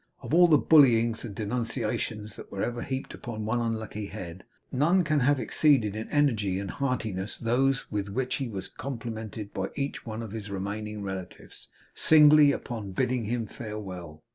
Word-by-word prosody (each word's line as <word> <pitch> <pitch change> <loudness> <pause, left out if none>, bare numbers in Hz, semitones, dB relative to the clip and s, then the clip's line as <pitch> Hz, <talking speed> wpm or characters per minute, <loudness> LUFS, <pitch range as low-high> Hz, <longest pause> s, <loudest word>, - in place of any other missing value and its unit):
Of - - -5
all 175 +1 +7
the 155 -3 +6
bullyings 120 -8 +5
and 105 -4 -7
denunciations 110 -1 -3
that - - -11
were 100 - -3
ever 120 0 -2
heaped 130 +1 -4
on 110 -2 -4
one 115 +3 0
unlucky 110 -2 -3
head, 95 -3 -8 0.3
none 165 +8 +3
can 155 -2 +2
ever 125 - +1
have 145 -1 +3
exceeded 115 -3 +2
in 110 +1 -5
energy 115 -11 +2
and 100 0 -4
heartiness 110 -8 -2
those 125 +3 +1
with 100 -2 -2
which 125 +5 -1
he 135 - -3
was 100 -4 -5
complimented 115 -5 -6
by 95 0 -2
each 140 0 -2
of 110 -1 -5
his 105 -1 -6
remaining 105 +2 -4
relatives, 95 -2 -8 0.3
singly, 150 -2 +7
upon 110 -8 -5
bidding 120 +4 0
him 115 +1 -1
farewell. 90 -8 -8
115 Hz, 165 wpm, -28 LUFS, 105-130 Hz, 0.3 s, all